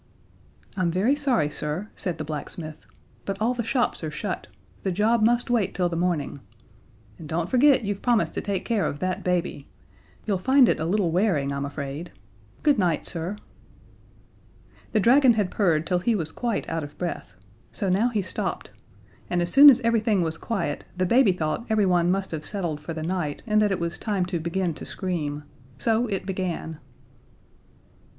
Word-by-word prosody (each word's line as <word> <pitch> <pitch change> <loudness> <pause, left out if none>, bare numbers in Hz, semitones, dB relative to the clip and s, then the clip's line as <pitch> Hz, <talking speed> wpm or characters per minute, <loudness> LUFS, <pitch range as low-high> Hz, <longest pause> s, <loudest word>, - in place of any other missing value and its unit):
"I'm 185 -3 +1
very 195 +11 +2
sorry, 255 - +1
sir," 150 +8 -3
said 175 -4 -3
the 155 - -4
blacksmith, 155 +1 -7 0.4
"but 195 0 -4
all 230 +3 +1
the 240 -1 -3
shops 245 -3 0
are 155 - -2
shut. 175 +5 -4 0.3
The 190 - -1
job 215 +5 +2
must 240 +2 +2
wait 215 -6 +1
till 180 -2 +1
the 170 - -4
morning. 170 -5 -1 0.8
And 155 -3 -9
don't 165 +1 -1
forget 260 +3 +4
you've 205 -1 -3
promised 240 -3 +2
to - - -2
take 195 -3 -3
care 225 -4 +1
of 145 - -4
that 185 +3 -2
baby. 180 -1 -1 0.6
You'll 200 -4 0
find 260 +5 +5
it - - +1
a 160 - -1
little 180 -1 +1
wearing, 165 -7 +1
I'm 140 0 -2
afraid. 145 +3 -6 0.5
Good 295 -6 +4
night, 175 -5 +1
sir." 170 +4 -3 1.6
The 215 - +2
dragon 250 +4 +6
had 210 -4 0
purred 165 -6 +2
till 180 0 +1
he 225 +6 +1
was 160 -5 -2
quite 235 +1 -2
out 165 -1 -2
of 145 - -10
breath 175 -1 -5 0.4
so 200 - -3
now 200 +6 +2
he 215 -5 -1
stopped, 185 - -3 0.6
and 175 - 0
as 175 0 0
soon 285 +2 +10
as 260 -2 +5
everything 220 -5 +2
was 160 -1 -2
quiet 170 -6 -3
the 185 - +1
baby 235 +2 +5
thought 165 +5 -2
everyone 185 -5 +3
must 195 +1 0
have 155 -2 -4
settled 170 -5 -3
for 165 +1 -6
the 160 - -4
night, 165 -4 -3
and 215 -1 +3
that 210 -1 +2
it 190 - 0
was 170 0 -3
time 200 -5 -1
to 180 -1 -3
begin 170 +1 -1
to - - -9
scream. 150 -6 -3 0.3
So 225 - +1
it 195 -4 -3
began. 180 -4 -4
185 Hz, 185 wpm, -25 LUFS, 165-220 Hz, 1.6 s, soon